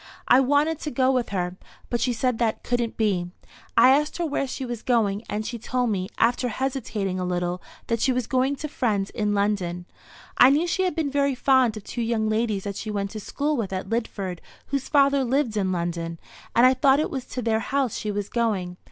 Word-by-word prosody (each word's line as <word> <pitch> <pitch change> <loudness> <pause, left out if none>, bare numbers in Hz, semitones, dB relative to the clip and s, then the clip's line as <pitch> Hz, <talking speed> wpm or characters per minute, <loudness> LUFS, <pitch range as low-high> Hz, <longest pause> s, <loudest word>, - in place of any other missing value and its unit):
I 250 - +7
wanted 290 +4 +2
to 305 - -4
go 260 0 +2
with 250 -2 0
her, 180 -2 -2 0.3
but 240 - 0
she 255 - +2
said 245 0 0
that 225 -2 0
couldn't 240 -2 -1
be. 190 -5 0 0.5
I - - +8
asked 295 +3 +2
her 345 - -1
where 285 -3 -1
she 260 +1 -5
was 240 -2 -5
going, 215 -4 +1
and 215 +1 -2
she 235 0 -5
told 245 +1 -1
me, 185 -2 -2
after 240 +2 +2
hesitating 225 -6 -2
a - - -1
little, 180 0 -2 0.2
that 230 -1 -1
she 265 - +3
was 250 -2 0
going 260 +3 +1
to 305 - -5
friends 215 -9 -1
in 210 -1 -1
London. 190 -4 -1 0.5
I 250 - +9
knew 295 +5 +3
she 375 +2 0
had 365 - -1
been 310 -4 -1
very 280 -1 +1
fond 255 -3 +3
of 210 - -8
two 240 - -5
young 225 -1 0
ladies 215 -3 0
that 200 -1 -4
she 215 - -5
went 200 -1 -2
to 215 - -6
school 295 +8 -2
with 225 -7 -2
at 190 0 -4
Lidford, 200 -6 -3 0.3
whose 275 -1 -3
father 280 -2 +4
lived 255 -2 0
in 195 -3 0
London; 170 -1 -3 0.4
and 235 - +6
I 255 - +6
thought 270 +1 +4
it 310 - -1
was 265 -3 -4
to 250 - -5
their 220 -1 +1
house 270 0 -1
she 215 - -3
was 205 -1 -2
going. 200 -7 -1
235 Hz, 220 wpm, -25 LUFS, 200-265 Hz, 0.5 s, I